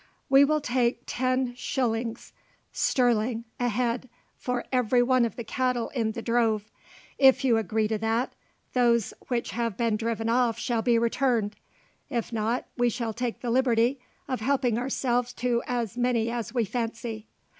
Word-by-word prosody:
"We 275 +1 +7
will 305 +1 +2
take 245 -2 0
ten 255 0 0
shillings 235 -2 -2 0.4
sterling 235 -2 +1 0.2
a 245 0 +1
head 240 +2 -1 0.3
for 250 -1 -3
every 250 -1 +3
one 255 -1 +3
of 225 - -4
the 235 - -5
cattle 250 0 -1
in 225 -4 -1
the 230 - -6
drove. 225 -3 +1 0.5
If 270 -1 +6
you 235 -3 +4
agree 220 0 0
to 215 0 -1
that, 225 +3 0 0.4
those 235 -3 +2
which 240 -2 -1
have 230 -4 -2
been 230 -2 +1
driven 225 0 -2
off 235 -1 +2
shall 235 -1 -1
be 235 0 +3
returned; 230 -2 +1 0.5
if 240 -4 -3
not, 225 +3 -1
we 245 -1 +2
shall 235 -1 -3
take 240 0 -3
the 240 - -2
liberty 245 +1 +2 0.3
of 255 -3 -2
helping 245 -1 +1
ourselves 245 -1 0
to 240 -1 0
as 235 -3 -2
many 235 -2 +1
as 235 -3 -3
we 240 -3 +1
fancy." 230 0 -4
240 Hz, 160 wpm, -27 LUFS, 225-250 Hz, 0.5 s, We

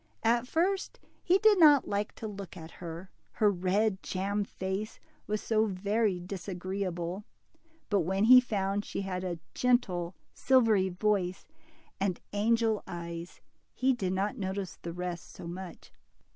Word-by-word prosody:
At 235 +2 +2
first 370 +7 0 0.2
he 365 +2 +4
did 425 -1 +5
not 295 -4 +7
like 205 +1 -2
to 220 - -6
look 200 -3 -8
at 160 0 -9
her, 170 +2 -7 0.2
her 210 -2 +3
red 190 +2 +1
jam 200 +2 -1
face 195 +2 -4 0.3
was 210 0 -1
so 220 -1 +2
very 200 0 0
disagreeable; 185 0 -4 0.6
but 205 - +2
when 190 +4 0
he 250 +3 +9
found 205 -4 -1
she - - -4
had 185 -2 -3
a 175 -2 -3 0.2
gentle 190 -9 +1 0.2
silvery 225 -7 +3
voice 185 -1 0 0.5
and 190 -2 0
angel's 220 +1 +2
eyes, 170 0 -7 0.3
he 260 +1 +3
did 190 -7 -2
not 195 +3 -1
notice 190 -1 -3
the 170 - -5
rest 175 0 -5
so - - -9
much. 180 +1 -8
195 Hz, 145 wpm, -30 LUFS, 180-220 Hz, 0.6 s, he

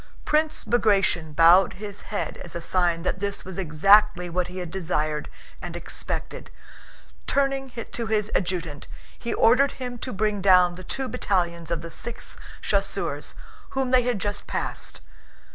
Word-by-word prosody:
Prince 305 +1 +1
Bagratión 195 -9 +2
bowed 170 +4 +6
his 205 +1 -6
head 210 - -4
as 170 - -8
a - - -2
sign 170 -1 +1
that 185 - -1
this 200 0 -2
was 190 0 -6
exactly 185 +2 +4
what 180 +1 0
he 180 +1 -9
had 175 -3 -5
desired 155 -5 -2 0.3
and - - -6
expected. - - -5 0.8
Turning 275 -1 +1 0.2
to 230 -1 -3
his 215 -1 0
adjutant 170 -5 -2 0.3
he 235 - -4
ordered 255 +5 +4
him 245 -2 -6
to 255 - -4
bring 210 0 0
down 180 -2 +6
the 185 +1 -9
two 265 +7 -2
battalions 170 -7 -1
of 170 -1 -2
the 165 - -7
Sixth 240 +6 -7 0.3
Chasseurs - - -1 0.4
whom 265 -1 +1
they 255 -1 +6
had 245 -2 0
just 205 +1 -3
passed. - - -3
195 Hz, 155 wpm, -25 LUFS, 175-230 Hz, 0.8 s, bowed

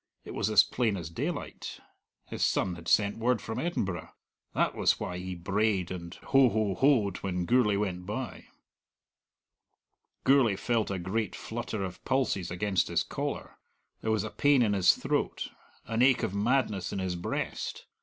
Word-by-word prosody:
It - - -7
was 105 - 0
as 105 -2 +7
plain 115 -5 0
as 85 -3 -6
daylight: 85 - -4 0.5
his - - -3
son 95 - +1
had 85 -1 -10
sent 105 +3 +3
word 120 0 +2
from 110 - -5
Edinburgh. 95 - -2 0.5
That - - +2
was - - +2
why 90 - -4
he 90 0 -5
brayed 95 +1 0
and 85 -1 -6
ho 135 -2 +4
ho 110 -3 0
hoed 110 -5 +3
when 90 -2 -2
Gourlay 120 -2 +3
went 90 -3 -2
by. 120 +4 -5 1.8
Gourlay 130 -7 +5
felt 115 +1 0
a 95 - -2
great 100 +5 -2
flutter 110 -3 -4
of 90 -2 -6
pulses 130 -9 0
against 90 0 0
his - - +1
collar; - - -5 0.4
there 110 - -2
was 110 -2 +2
a 110 - -5
pain 145 -3 +4
in 105 -3 +2
his 95 -3 +5
throat, - - -1 0.4
an 115 +2 -1
ache 130 0 +5
of - - -1
madness 105 -3 +1
in - - -3
his 95 -2 -2
breast. 85 - -4
105 Hz, 165 wpm, -29 LUFS, 90-120 Hz, 1.8 s, as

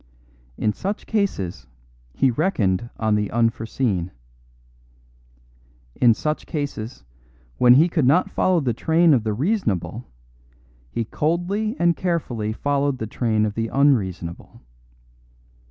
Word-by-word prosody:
In 105 - 0
such 200 - -4
cases 190 - -2 0.4
he 130 - +2
reckoned 120 - 0
on 110 -1 +1
the 105 -1 0
unforeseen. 115 -4 0 1.8
In 115 - +4
such 150 +5 -3
cases, 140 -6 -5 0.6
when 125 0 +7
he 155 +6 +6
could 160 -7 +1
not 170 +7 +3
follow 185 -3 +2
the 125 -4 0
train 160 +6 +3
of 120 -5 +2
the 110 -1 -1
reasonable, 130 - -2 0.8
he 115 - -3
coldly 175 - -1
and 170 -1 +3
carefully 130 -13 -2
followed 140 +3 0
the 110 - -4
train 110 -1 0
of 105 - -2
the 115 +1 -2
unreasonable. 100 - 0
125 Hz, 120 wpm, -22 LUFS, 110-165 Hz, 1.8 s, when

